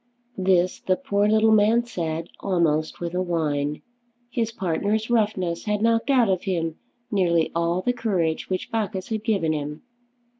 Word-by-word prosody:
This 185 -1 +2
the 185 - +1
poor 205 -6 0
little 220 +1 +4
man 220 +3 +4
said 165 -7 -4
almost 160 -5 0
with 170 0 -4
a 180 - 0
whine. 150 -4 -1 0.5
His 230 -2 -1
partner's 210 +4 -1
roughness 200 -7 0
had 210 0 0
knocked 230 +3 +2
out 255 -4 +4
of 190 -2 +1
him 165 -4 -2 0.3
nearly 170 -5 +2
all 170 +2 0
the 245 - +1
courage 185 -10 -1
which 185 -1 -3
Bacchus 205 -4 -2
had 220 -2 -2
given 195 -8 +1
him. 150 0 -5
185 Hz, 155 wpm, -24 LUFS, 170-220 Hz, 0.5 s, little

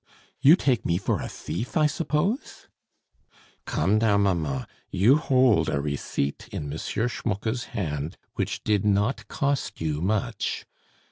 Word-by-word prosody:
"You 145 +5 +8
take 130 - +1
me 85 - +1
for 95 - -1
a - - -4
thief, 120 +7 -4
I 155 - +5
suppose?" 165 - -1 1.0
"Come, 105 +3 +2
now, 110 -2 +3
mamma, 80 -10 0 0.2
you 110 +10 +5
hold 130 -7 +3
a 70 - 0
receipt 70 -1 -2
in 70 0 -4
M. - - -4
Schmucke's 115 0 -2
hand 80 - -4 0.2
which - - -3
did 105 -2 +2
not 105 +4 +1
cost 140 -2 -1
you 75 -2 -1
much. 110 +4 -1
105 Hz, 135 wpm, -26 LUFS, 85-130 Hz, 1.0 s, You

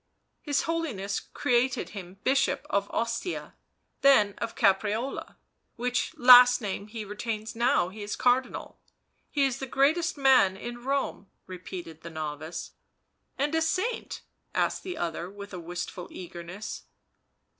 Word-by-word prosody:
His 290 -2 0
Holiness 265 -13 -2
created 250 +1 0
him 190 -2 -9
Bishop 270 +1 +2
of 200 0 +1
Ostia, 230 +10 -3 0.5
then 215 -8 +6
of 230 +1 -4
Caprarola, 215 +3 +1 0.4
which 245 +1 -1
last 245 0 +9
name 205 -2 -4
he 215 0 -6
retains 215 +2 -4
now 235 -6 +2
he 210 +3 -10
is 205 +1 -3
Cardinal 255 +1 0 0.3
— - - -48
he 285 -2 +2
is 270 -1 -1
the 270 - -4
greatest 310 +6 +2
man 255 -9 +5
in 240 +3 -7
Rome," 270 -6 -1 0.2
repeated 180 -3 -8
the 170 - -8
novice. 155 +1 -5 0.7
"And 290 +3 0
a 325 - +2
saint?" 370 +9 -1 0.3
asked - - +1
the 365 -3 -6
other 170 +1 -3
with 200 0 -10
a 180 - -5
wistful 175 +1 -6
eagerness. 175 +3 -8
225 Hz, 135 wpm, -28 LUFS, 190-265 Hz, 0.7 s, last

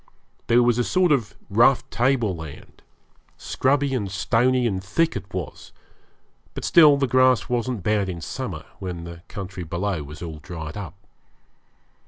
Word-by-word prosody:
There 120 +1 +5
was 120 0 +2
a - - +3
sort 180 +5 +2
of 120 -8 +1
rough 120 +5 +4
table 120 -6 +1
land 80 -3 -11 0.6
scrubby 140 +1 0
and 105 -7 -1
stony 120 +5 +2
and 95 -5 -1
thick 160 +13 0
it 95 -2 -6
was, 90 -4 -6 0.8
but - - -4
still 150 -4 +7
the 140 - +1
grass 130 0 +3
wasn't 120 -4 -1
bad 105 -1 +1
in 85 -2 -5
summer, - - -5
when 90 -3 -5
the 85 0 -9
country 95 -2 -7
below 85 +1 -2
was 75 +3 -9
all 80 -2 -7
dried 80 -1 -7
up. 95 -5 -7
105 Hz, 155 wpm, -23 LUFS, 90-130 Hz, 0.8 s, still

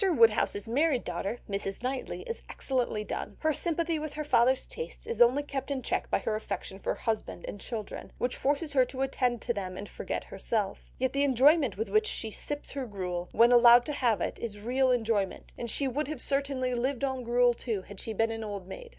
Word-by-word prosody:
Woodhouse's 230 - +3
married 270 +2 +2
daughter, 180 +6 -3
Mrs. 195 +2 -3
Knightley, 260 +1 -3
is 465 -1 -5
excellently 245 -5 -1
done; - - -5
her 315 -1 +2
sympathy 335 +1 0
with 305 -1 -5
her 305 - -3
father's 260 -2 +3
tastes 475 - -7
is 465 - -2
only 250 +5 +6
kept 275 -1 -4
in 270 -3 -2
check - - -1
by - - +3
her 215 - -2
affection 195 -2 -5
for - - -1
husband 220 -6 -3
and 205 - -6
children, 220 -4 -6
which 245 0 -1
forces 290 +2 0
her 260 -2 +6
to 260 +1 -3
attend 250 -3 0
to 235 - 0
them 185 -3 -4
and 205 - -6
forget - - -4
herself; 210 -4 -2
yet 260 0 0
the 280 - +1
enjoyment 275 - +4
with 220 - -1
which 430 0 +3
she 220 - -3
sips 290 +6 -5
her 270 -2 -4
gruel, 180 -4 -4
when 235 +2 +5
allowed 240 0 +8
to 300 - -2
have 240 -6 +1
it, - - -2
is 210 -3 -5
real 255 +4 +2
enjoyment, 225 -5 0
and 235 - -4
she 275 +5 +1
would 265 +3 -1
have 305 -3 -4
certainly 275 -2 0
lived 255 +2 -1
on 265 -2 -1
gruel 240 +1 +4
too 220 -5 -3
had 205 0 -11
she 225 - -4
been 225 +1 +1
an 225 0 -4
old 200 -3 -5
maid. 470 - -8
245 Hz, 215 wpm, -29 LUFS, 220-275 Hz, -, allowed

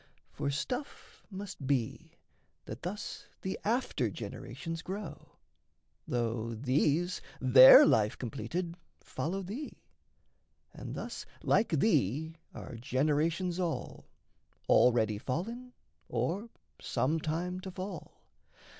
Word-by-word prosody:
For - - -2
stuff 245 - -5
must 190 -8 -7
be, 130 -5 -1 0.5
That 110 +3 -7
thus 195 +5 -5 0.2
the 190 - -3
after 240 +5 0
generations 165 -1 -6
grow, 195 +4 -7 0.7
Though 115 -1 -1
these, 145 +8 +1 0.2
their 130 0 +10
life 105 -1 +3
completed, 165 +8 -4 0.3
follow 190 +5 -3
thee; 230 +11 -7 0.9
And - - -7
thus - - -6 0.2
like 225 - +3
thee 160 - +2 0.2
are 115 - -8
generations 155 +8 0
all 175 -3 -3 0.6
Already 110 -4 +4
fallen, 230 - -4 0.4
or 170 - -1 0.3
some 155 +5 0
time 175 +4 -2
to 190 - -7
fall. 185 -1 -7
160 Hz, 100 wpm, -31 LUFS, 130-190 Hz, 0.9 s, their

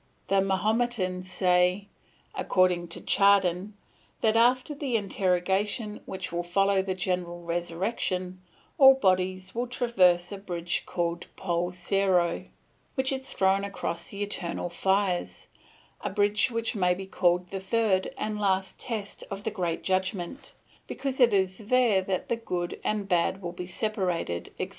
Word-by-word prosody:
"The 195 0 +4
Mahometans 190 -2 0
say, 180 +2 +2 0.5
according 180 -2 +2
to 165 - -4
Chardin, 200 0 +3 0.5
that 220 -1 +3
after 250 +5 +3
the 280 -4 -2
interrogation 200 +2 0
which 190 -1 -5
will 170 0 -1
follow 195 +2 +2
the 190 -1 -3
general 180 -2 -2
resurrection, 180 +2 -2 0.4
all 270 -1 +9
bodies 185 -4 0
will 240 +2 -2
traverse 185 -8 +2
a 200 - -6
bridge 175 -3 -3
called 170 -1 -2
Poul 175 -1 -1
Serrho, 180 -1 +1 0.5
which 265 -1 +1
is 265 0 -2
thrown 195 +1 +2
across 170 -4 -4
the 200 0 -3
eternal 175 -3 -3
fires, 190 0 0 0.5
a - - -1
bridge 205 +2 +2
which 230 -1 -2
may 180 -4 +2
be 190 +1 -7
called 180 -1 +1
the 195 - -3
third 190 -1 +1
and 215 -1 -3
last 190 -2 0
test 215 -5 -5
of 195 +1 -6
the 220 - -2
great 175 -5 -2
Judgment, 190 +7 -2 0.3
because 270 -1 -4
it 245 -2 +6
is 190 -2 +1
there 225 -2 +3
that 185 -1 -2
the 235 - 0
good 180 -6 -4
and 210 -2 -1
bad 180 +1 +1
will 175 -3 -5
be 180 0 -6
separated, 180 - -2
etc. - - -3
190 Hz, 145 wpm, -27 LUFS, 180-210 Hz, 0.5 s, all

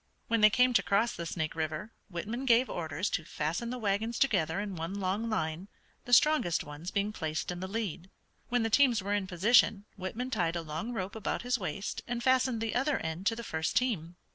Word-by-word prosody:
When 230 -1 +2
they 215 - +9
came 250 +3 +4
to - - +5
cross 210 +4 +1
the 170 0 -5
Snake 160 -2 -2
River 160 +6 -3 0.2
Whitman 220 +9 -4
gave 245 0 +4
orders 160 +2 -2
to 165 - -1
fasten 160 +10 -3
the 250 - -3
wagons 220 +1 -1
together 180 - +2
in 200 -2 -4
one 165 +3 -4
long 200 +4 -1
line, 165 -3 -2 0.4
the 245 - -7
strongest 255 - +4
ones 150 +4 -7
being 205 +2 -1
placed 160 -2 -3
in 175 - -5
the 185 - -4
lead. 190 -4 -4 0.4
When 245 -1 +2
the 225 - -1
teams 245 -5 +4
were 200 +1 -1
in 205 -2 0
position 205 +2 +4
Whitman 220 +7 -4
tied 175 -7 0
a 170 - -2
long 160 +10 -4
rope 195 -4 -4
about 220 - -2
his 250 0 0
waist 195 +1 -4
and 240 0 -3
fastened 255 -3 +3
the 225 -1 -1
other 270 +3 +1
end 160 +4 -3
to 225 - +2
the 235 - -6
first 160 -6 -2
team. 180 -10 0
200 Hz, 215 wpm, -31 LUFS, 170-235 Hz, 0.4 s, they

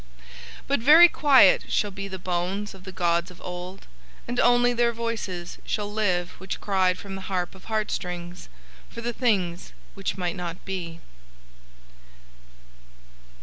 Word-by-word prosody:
"But 280 - +1
very 310 +8 +9
quiet 275 - +5
shall 205 - 0
be 195 +1 -6
the 190 -1 -6
bones 185 +3 -3
of 190 -1 -14
the 190 - -7
gods 170 -1 0
of 180 - -14
Old, 180 +1 -7 0.4
and 245 0 -2
only 245 0 +4
Their 235 0 +2
voices 220 -7 -4
shall 205 -1 -3
live 180 -5 0
which 190 +1 -5
cried 185 -2 +1
from 195 0 -8
the 195 - -6
harp 180 -2 -2
of 190 - -16
heart 215 -1 -1
strings, 175 - -5 0.4
for 235 - -8
the 240 +1 -3
things 190 -8 -1 0.2
which 195 -1 -4
might 180 -2 -2
not 175 -1 -6
be." 170 -4 -5
190 Hz, 150 wpm, -25 LUFS, 180-220 Hz, 0.4 s, very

